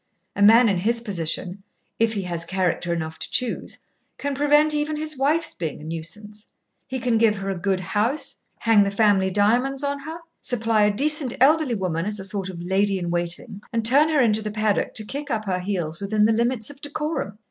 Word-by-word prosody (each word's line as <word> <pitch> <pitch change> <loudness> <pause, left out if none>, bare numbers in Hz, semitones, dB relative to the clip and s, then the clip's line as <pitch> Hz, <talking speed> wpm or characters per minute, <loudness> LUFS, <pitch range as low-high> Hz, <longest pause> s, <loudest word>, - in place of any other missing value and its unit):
A - - -3
man 225 +4 +7
in 195 -3 +2
his 230 +6 0
position, 185 -2 -4 0.4
if 225 0 +2
he 200 -3 -2
has 170 -2 -2
character 180 -1 -1
enough 160 -2 -3
to - - -6
choose, 250 -2 -2 0.4
can 285 0 -3
prevent 295 +2 +3
even 300 +1 -1
his 310 0 -3
wife's 295 +5 +1
being 160 -4 -4
a - - -11
nuisance. 205 +7 -7 0.4
He 260 -1 -3
can 240 -3 +1
give 220 -2 +4
her 195 -1 -3
a - - -3
good 190 +1 -1
house, 215 - -1 0.2
hang 225 -2 +4
the 200 - +2
family 200 -2 +3
diamonds 245 +8 +2
on 285 0 -1
her, 315 +4 -7 0.2
supply 225 -3 +1
a 210 - +3
decent 285 +3 0
elderly 285 -1 +4
woman 180 -3 -2
as 210 -1 -4
a - - -6
sort 195 0 -4
of 170 -2 -7
lady 195 +2 +1
in 175 -2 -3
waiting 175 +5 -3
and 230 -2 -1
turn 285 +7 +5
her 310 -2 +2
into 220 -4 +3
the 215 - -4
paddock 215 -1 0
to 215 - 0
kick 285 +6 -5
up 215 -1 -2
her 185 -2 -1
heels 180 -4 -3
within 210 +1 +1
the 225 - +3
limits 235 +1 0
of 285 0 -16
decorum. 295 -7 -3
215 Hz, 210 wpm, -23 LUFS, 190-260 Hz, 0.4 s, man